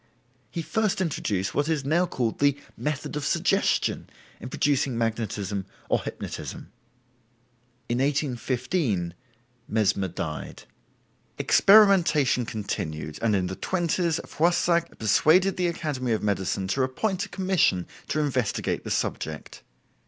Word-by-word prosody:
He 165 - -4
first 220 +1 0
introduced 105 - -1
what 145 +2 0
is 150 -4 0
now 170 +5 +2
called 120 -8 -2
the 140 -1 +3 0.2
"method 150 0 -3
of 150 - -3
suggestion" - - +1 0.3
in 125 - -7
producing 135 -3 +1
magnetism 105 -4 -2 0.2
or - - +2
hypnotism. - - -7 1.2
In 120 +1 -1
1815 130 - 0 0.5
Mesmer 105 -3 +1
died. 80 -3 -6 0.7
Experimentation 180 - +5
continued, 80 -8 -4
and 110 -2 +2
in 95 -2 +1
the 95 +1 -4
20's 175 - 0
Foissac 170 0 +1
persuaded 170 - +4
the 180 -1 +1
Academy 145 -8 -2
of 110 - -1
Medicine 95 -1 -1
to 135 - +1
appoint 185 +9 -1
a - - -25
commission 180 - +1 0.2
to 155 - -1
investigate 130 -7 -1
the - - -6
subject. 80 -1 -3
135 Hz, 120 wpm, -26 LUFS, 105-170 Hz, 1.2 s, Experimentation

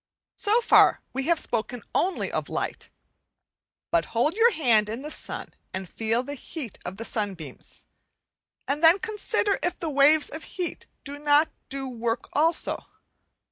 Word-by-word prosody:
So 435 +4 +2
far - - +5
we 270 0 -2
have 340 -2 +3
spoken 235 0 -2
only 375 +1 0
of - - -3
light; - - -4 1.0
but 335 - +3
hold 295 +7 +3
your 455 +4 +5
hand 235 - +3
in 230 +5 -5
the 300 - -4
sun - - -2 0.3
and 190 0 -5
feel 225 +6 -1
the 285 +2 -6
heat 275 - -7
of 180 +2 -6
the 230 - -5
sunbeams, 190 - -5 0.8
and 290 +2 -1
then 330 +3 +8
consider 420 -1 -1
if 355 0 -1
the 325 -2 -3
waves 290 +2 +5
of 315 - -6
heat 360 -2 -5 0.2
do 285 0 -6
not 295 +1 +4 0.2
do 270 0 -2
work 235 -1 -3
also. 320 +3 +1
285 Hz, 155 wpm, -26 LUFS, 230-335 Hz, 1.0 s, then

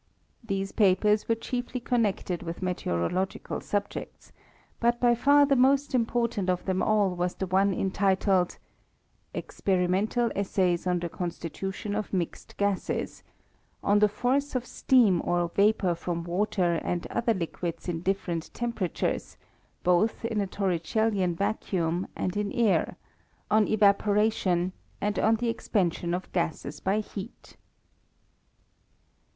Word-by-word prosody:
These 195 -2 -2
papers 210 +1 +3
were 230 - +4
chiefly 245 +2 -4
con 245 0 +1
nected 190 -4 -1
with 170 +2 -6
meteorological 180 - -2
subjects; 205 0 -4 0.5
but 240 0 +2
by 240 -1 +4
far 285 +5 +5
the 280 -1 +3
most 275 +2 +3
important 235 -5 0
of 180 -1 0
them 185 -1 0
all 210 -3 +3
was 180 0 -2
the 190 - -3
one 190 +2 +2
en 190 0 -1
titled 190 -2 +2 0.4
*' - - -42
Experimental 195 +5 0
Essays 185 -3 0
on 180 0 +2
the 175 0 -2
Constitution 180 +4 -5
of 210 0 -3
mixed 175 -3 -3
Gases; 200 -2 -1 0.6
on 205 +1 +4
the 210 0 +5
Force 260 +7 0
of 250 -1 -1
Steam 230 -8 +3
or 175 -1 0
Vapour 200 -1 +2
from 170 0 -3
water 175 -1 0
and 175 -1 -2
other 230 -1 +1
liquids 170 -1 -4
in 165 -2 -2
different 180 -3 -2
temperatures, 230 -8 -2 0.5
both 180 +6 +2
in 225 -2 0
a 200 - -1
torricellian 190 0 0
vacuum 185 -3 -1
and 185 - -2
in 205 -1 -1
air; 230 -4 +2 0.5
on 215 0 +4
Eva 205 -2 +5
poration; 200 -4 +1 0.3
and 210 0 -1
on 225 +1 +4
the 235 +1 -1
Expansion 175 -6 0
of 185 - -6
Gases 160 -4 -2
by 200 +3 +1
Heat." 205 +1 -9
195 Hz, 135 wpm, -27 LUFS, 180-220 Hz, 0.6 s, far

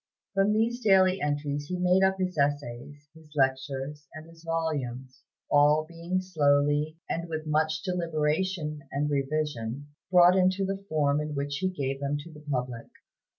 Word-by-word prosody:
From 195 +1 +3
these 230 +3 +1
daily 190 -3 +4
entries 145 0 -2
he 180 - -3
made 180 +1 +3
up 190 0 +3
his 185 -1 -2
essays, 145 0 -2
his 160 -1 -17
lectures, 135 +1 -1
and 155 0 -9
his 165 0 -17
volumes; 135 -6 -3 0.3
all 150 +2 +5
being 170 +2 -3
slowly, 145 -2 +2
and 170 +1 -3
with 155 -1 -4
much 155 +1 0
deliberation 165 -2 -1
and 145 +2 -1
revision, 140 -2 -2 0.2
brought 180 -1 +7
into 185 +1 +2
the 195 +1 -4
form 150 -1 +2
in 150 0 -4
which 140 0 -2
he 185 +5 0
gave 135 -6 -3
them 140 +1 -1
to 155 +3 -10
the 150 - -12
public. 125 -3 -3
150 Hz, 155 wpm, -28 LUFS, 145-180 Hz, 0.3 s, brought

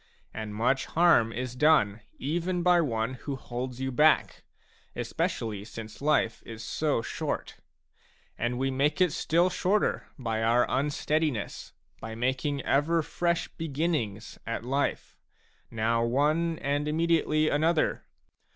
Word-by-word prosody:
And 110 -1 -5
much 125 +4 +1
harm 165 -10 +4
is 125 +1 -4
done 125 -8 +3 0.2
even 175 +5 -1
by 175 -1 +5
one 115 -4 -1
who 140 - -4
holds 125 -1 -5
you 130 0 -2
back, 150 +5 +3 0.5
especially 105 -3 -2
since 110 +1 -9
life 145 -6 +1
is 115 0 -9
so 145 -5 0
short; - - -4 0.8
and 120 +2 -2
we 135 +1 0
make 140 +5 +1
it 180 -3 +4
still 170 +4 +2
shorter 200 +4 0
by 115 -4 -2
our 115 +2 +3
un 140 +2 0
steadiness, 150 -6 -2 0.3
by 110 0 -7
making 130 +4 -1
ever 160 +4 +2
fresh 170 +2 -1
beginnings 145 - -3
at 115 0 -3
life, 140 +3 -2 0.5
now 115 +1 +1
one 155 +7 +1
and 145 +1 0
immediately 155 -1 +2
another. 160 +2 +1
135 Hz, 130 wpm, -28 LUFS, 115-155 Hz, 0.8 s, by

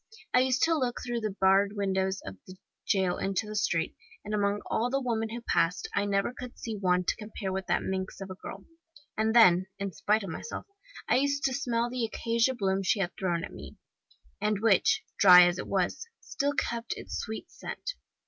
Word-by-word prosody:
I 250 - +6
used 260 0 +2
to 330 - +4
look 255 -5 -1
through 240 -1 -2
the 215 -3 -3
barred 195 +1 +4
windows 190 -1 0
of 95 - -7
the 185 - -10 0.3
jail 190 -4 +1
into 195 +2 -1
the 215 0 -7
street, 165 -5 0 0.3
and 210 - -4
among 205 0 +1
all 240 +2 0
the 270 +2 +1
women 225 -4 -1
who 235 +2 -6
passed 180 -6 +1
I 200 - +1
never 200 +3 0
could 250 -1 -9
see 225 -2 -5
one 180 -2 +1
to - - 0
compare 210 -3 -5
with 190 -1 -3
that - - +1
minx 190 0 -3
of 195 -1 -7
a - - -3
girl 190 +1 -9 0.5
and 220 +1 +1
then, 185 -5 +6
in 195 -1 -3
spite 210 +6 +1
of 190 - -5
myself, 315 - -6 0.4
I - - +4
used 280 +1 +1
to 265 - +1
smell 240 -3 0
the 250 -1 -2
acacia 230 +3 0
blossom 195 -3 0
she 200 +3 +1
had 180 -2 0
thrown 175 -3 -1
at - - -7
me, - - -10 0.6
and 210 -1 +1
which, 210 -3 +3 0.2
dry 180 -2 +9
as 175 +1 0
it - - -5
was, 190 - -1
still 285 +1 -2
kept 235 -4 -2
its - - -5
sweet 220 0 -6
scent. - - -6
205 Hz, 205 wpm, -29 LUFS, 190-235 Hz, 0.6 s, dry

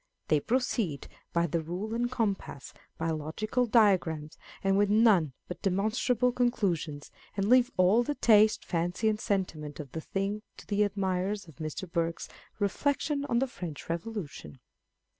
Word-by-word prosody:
They 155 - +4
proceed 225 - -1 0.2
by 170 0 +2
the 170 0 -1
rule 180 +7 -4
and 240 +1 0
compass, 205 - -3 0.2
by 165 0 -1
logical 210 +11 -1
diagrams, 180 -9 +3 0.3
and 195 0 +3
with 205 0 +3
none 205 - +4
but 180 - -7
demonstrable 220 +5 +1
conclu 240 -7 +2
sions, 150 -3 -8 0.3
and 195 0 +1
leave 250 +1 +5
all 185 +6 +5
the 290 +4 -2
taste, 215 -3 +4
fancy, 175 +5 0
and 215 -1 -1
sentiment 165 -9 -2
of 140 -4 -7
the 160 - -5
thing 195 +5 -2 0.2
to - - -12
the 205 0 0
admirers 195 0 -1
of 160 - -15
Mr. 155 +3 -5
Burke's 170 0 -2 0.3
Reflections 280 +7 0
on 235 - +2
the 260 - +3
French 175 - -7
Revolution. 165 - -5
195 Hz, 155 wpm, -29 LUFS, 165-225 Hz, 0.3 s, leave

